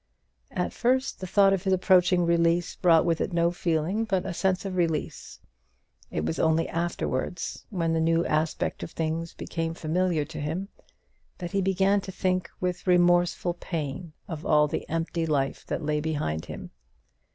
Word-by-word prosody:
At 180 - -2
first, 260 +3 +1
the 185 - -5
thought 195 +1 +5
of 195 - 0
his 190 -1 +2
approaching 180 -1 +4
release 170 0 +2
brought 165 -2 +4
with 165 -2 +1
it 190 - -2
no 170 0 +3
feeling 175 +4 0
but 195 -4 0
a 190 - -3
sense 190 +2 0
of 190 -1 -3
release. 165 -4 -2 0.7
It 75 - -2
was 80 0 -2
only 160 0 +2
afterwards, 170 -1 -3
when 170 -5 0
the 165 - +1
new 165 +1 +2
aspect 155 +1 -1
of - - -5
things 165 +1 -3
became 165 -1 -3
familiar 165 -1 0
to 155 +1 -8
him, 170 +7 -3 0.7
that 175 -2 -6
he 195 - +1
began 195 +1 +2
to 190 - -7
think 185 -1 -1
with 180 0 -3
remorseful 175 0 +3
pain 165 -1 -5
of 165 -4 -6
all 150 -2 +4
the - - -4
empty 165 0 -1
life 140 -3 -1
that - - -3
lay 150 0 +1
behind 145 - -2
him. - - -8
170 Hz, 170 wpm, -27 LUFS, 160-185 Hz, 0.7 s, thought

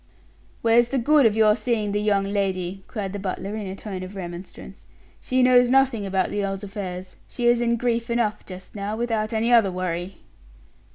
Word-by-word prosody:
"Where's 230 +1 +5
the 275 - -1
good 285 +1 +5
of 215 - 0
your 215 -1 +5
seeing 215 -2 -1
the 205 +1 0
young 205 -2 +2
lady?" 195 -2 -2
cried 200 -4 -5
the 205 - -4
butler, 195 +1 -4
in 210 -2 -5
a 190 - -5
tone 195 -2 -6
of 185 +2 -8
remonstrance. 175 -1 -9 0.3
"She 255 0 +1
knows 250 -1 +5
nothing 255 -6 +2
about 190 -1 0
the 205 - -1
earl's 195 0 -3
affairs; 185 -2 -6
she 240 - -4
is 240 0 +4
in 235 0 +2
grief 235 0 -1
enough 235 -3 0
just 185 0 -11
now, 205 +1 -3
without 225 -2 -1
any 230 +2 +1
other 220 -5 +5
worry." 180 0 -4
210 Hz, 190 wpm, -24 LUFS, 195-235 Hz, 0.3 s, Where's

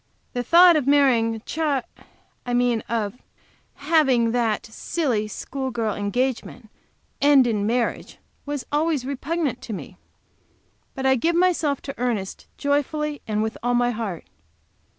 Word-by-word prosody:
The 245 - -1
thought 345 +7 +7
of 290 -4 0
marrying 240 -6 +3
Ch, 315 - -7
I 275 -4 -4
mean 245 -2 +2
of 225 0 -2 0.5
having 280 -6 +2
that 230 -3 0
silly, 225 -1 -2
school 265 +5 -5
girl 225 -4 -1
engagement 230 +2 -2 0.5
end 280 -2 +6
in 210 -3 0
marriage, 235 +1 -1 0.3
was 290 -2 -4
always 295 -3 0
repugnant 280 0 -2
to 225 - -6
me. 195 - -8 1.0
But 265 - -4
I 265 - +5
give 325 +7 +1
myself 335 -6 +1
to 275 -2 -7
Ernest 225 -6 -3
joyfully 290 +1 -1
and 215 0 0
with 220 0 -4
all 245 +1 +1
my 245 0 +2
heart. 215 -7 -5
250 Hz, 135 wpm, -23 LUFS, 230-290 Hz, 1.0 s, thought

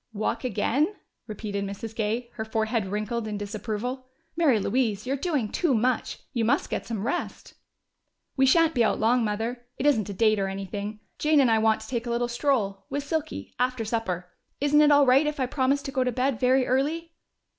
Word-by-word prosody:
"Walk 215 +4 -2
again?" 255 - 0 0.3
repeated 205 -2 -4
Mrs. 200 +3 -6
Gay, 230 +2 -2
her 220 - -4
forehead 220 -1 -1
wrinkled 215 +3 -2
in 210 -1 -3
disapproval. 220 +5 -4 0.3
"Mary 300 -9 +3
Louise, 220 -1 0
you're 265 +2 0
doing 280 -6 -1
too 280 - +1
much! 245 +2 0 0.2
You 235 -3 0
must 225 - +1
get - - -3
some 220 -3 -3
rest!" 350 - -4 0.8
"We 270 -1 +4
shan't 325 +3 +4
be 240 - +3
out - - +1
long, 235 +2 +3
Mother. 225 +3 -2
It 270 - -3
isn't 220 -9 +3
a - - -3
date 215 +1 +3
or 195 - 0
anything. 200 +2 -5 0.2
Jane 305 0 +4
and 255 -4 +4
I 220 - +4
want 220 0 +2
to 220 - -9
take 240 -1 -3
a - - -2
little 240 +1 0
stroll, 235 -6 -1
with 285 +1 -2
Silky, 310 +1 -4
after 250 -2 0
supper. 200 -6 -2 0.3
Isn't 290 +1 +4
it 300 - +6
all 285 -1 +6
right 270 +4 +5
if 300 -1 -3
I 260 - +2
promise 270 +2 0
to 275 - -5
go 260 -1 +1
to 250 - 0
bed 255 -1 0
very 255 +1 +3
early?" 310 +6 -1
240 Hz, 200 wpm, -26 LUFS, 215-270 Hz, 0.8 s, it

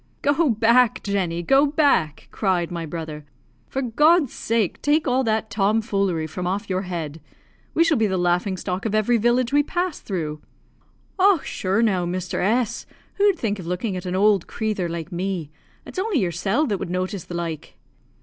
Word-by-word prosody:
"Go 290 +2 +3
back, 235 +2 +3
Jenny; 180 -4 -1
go 270 - +4
back," 280 - +1
cried 180 -5 0
my 170 -2 -4
brother. 155 -2 -6 0.4
"For 270 - -3
God's 295 +4 +3
sake 225 -5 -1
take 300 +1 +2
all 255 +1 +2
that 220 0 0
tom 210 +1 +2
foolery 195 -7 -1
from 175 +3 -4
off 200 +3 -2
your 185 0 0
head. 165 -5 -5 0.5
We 330 - +5
shall 325 -3 +2
be 220 -1 +2
the 190 -1 -1
laughing 180 +2 +1
stock 185 +3 -3
of 215 - -1
every 215 +3 +3
village 240 +3 +1
we 290 - +5
pass 350 +2 -2
through." 155 -6 -4 0.8
"Och, 380 -4 +4
shure 195 +4 0
now, 185 -6 +1
Mr. 180 +1 -3
S, 225 +4 0 0.3
who'd 400 -2 +4
think 210 -7 -2
of 170 - -8
looking 185 +3 -2
at 180 0 -5
an 180 - -2
owld 200 -1 +3
crathur 210 -6 -2
like 170 +1 -5
me! 175 -3 -3 0.3
It's - - -6
only 400 -3 0
yersel' 195 - 0
that 205 -8 -1
would - - -4
notice 185 +1 -3
the 175 - -7
like." 165 -3 -5
200 Hz, 180 wpm, -23 LUFS, 180-245 Hz, 0.8 s, We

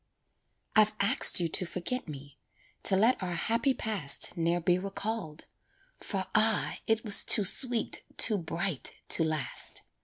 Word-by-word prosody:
I've 215 -1 +2
asked 200 - +5
you 170 - -2
to 170 - -1
forget 185 +9 -5
me, 140 -1 -13 0.5
To 195 - +5
let 225 +6 0
our 180 -2 -5
happy 235 +8 -2
past 195 -11 +2
Ne'er 170 +1 -2
be 175 +1 -1
recalled; 195 -4 -7 0.5
for 190 -2 -5
ah! 215 0 +2
it 220 0 -2
was 205 - +5
Too 205 - +5
sweet, 240 +3 +1
too 215 -3 +3
bright! 165 -1 -4 0.2
to 165 - +5
last. 155 -5 -2
195 Hz, 145 wpm, -27 LUFS, 165-220 Hz, 0.5 s, asked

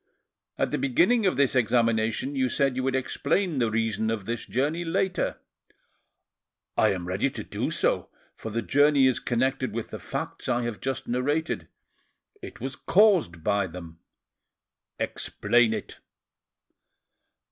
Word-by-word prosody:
"At - - 0
the - - -1
beginning 185 - +3
of 185 - +1
this 140 -2 +2
examination 115 +2 +1
you 130 -1 +1
said 135 -1 +1
you 130 - -1
would 135 0 0
explain 145 +5 0
the 115 -2 +2
reason 110 0 0
of 110 -4 -2
this 115 +2 -4
journey 150 +7 0
later." 180 +3 -1 1.4
"I 110 - +4
am 90 -2 -4
ready 95 +9 0
to - - -7
do - - -3
so, - - 0 0.3
for 110 - -7
the 115 +2 -2
journey 145 +2 +4
is 130 -1 +3
connected 130 +2 -1
with 115 -1 -4
the - - -6
facts - - -5
I 120 0 +1
have 120 -3 -4
just 135 -1 -3
narrated; 130 - -1 0.7
it - - -9
was 135 +2 -4
caused 180 - +3
by 100 -1 +1
them." 85 -2 -10 1.0
"Explain 120 -2 +1
it." - - -5
125 Hz, 145 wpm, -26 LUFS, 110-140 Hz, 1.4 s, I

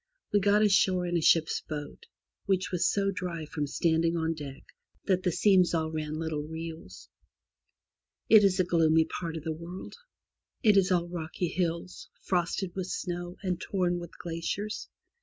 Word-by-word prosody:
We 205 - +5
got 205 +2 +4
ashore 190 -3 +3
in 175 0 -1
a 170 - +2
ship's 160 +1 +3
boat, 150 - -7 0.4
which 190 -1 +1
was 180 -2 +2
so 195 -1 +1
dry 180 -4 -4
from 150 -2 -3
standing 165 +3 +1
on 165 0 0
deck 140 -3 -8 0.4
that 185 -2 +2
the 180 - +1
seams 180 0 +4
all 160 -1 -1
ran 155 -1 -3
little 160 -2 -2
rills. 160 - -8 1.2
It 215 -1 +8
is 190 -2 +3
a - - +5
gloomy 160 -2 +3
part 165 -1 -5
of 155 - -7
the 160 -1 -2
world. 170 +4 -8 0.7
It 210 -3 +6
is 195 -1 +4
all 175 -1 +2
rocky 170 0 -3
hills, 170 0 -3
frosted 180 0 -1
with 185 -2 -4
snow, 175 -1 -4
and 180 -2 -2
torn 180 -3 0
with 170 -1 -10
glaciers. 175 +5 -4
175 Hz, 165 wpm, -29 LUFS, 160-185 Hz, 1.2 s, It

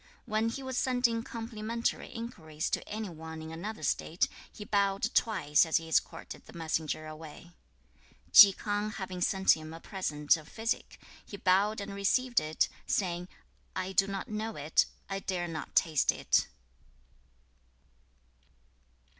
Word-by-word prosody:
When 215 +1 +1
he 270 +4 -5
was 260 -1 -2
sending 245 -3 +2
complimentary 230 0 -3
inquiries 160 -10 -5
to - - -2
any 215 0 -3
one 160 -1 -8
in 160 0 -7
another 175 +2 -6
State, 160 +4 +1 0.2
he 210 - -9
bowed 200 +1 +1
twice 150 -10 +3
as 160 -2 +2
he 165 - -5
escorted 160 - -2
the - - -11
messenger 160 -1 -2
away. 155 +2 -10 0.8
2. 200 - +12
Chi - - -21
K'ang 210 0 -1
having 185 -2 -5
sent 190 +1 +4
him 155 0 -8
a - - -9
present 150 -6 +1
of 155 -1 -13
physic, 225 +2 -3 0.2
he 200 - -9
bowed 200 +3 +3
and 200 0 -5
received 240 +5 +2
it, 155 +1 +1 0.2
saying, 175 -2 0 0.5
'I 185 0 -2
do 195 +1 +3
not 195 -1 -4
know 215 +1 -4
it. 150 +2 +2 0.2
I 195 0 -3
dare 180 -3 -2
not 160 -3 -6
taste 155 -3 +4
it.' - - +2
195 Hz, 145 wpm, -31 LUFS, 160-215 Hz, 0.8 s, 2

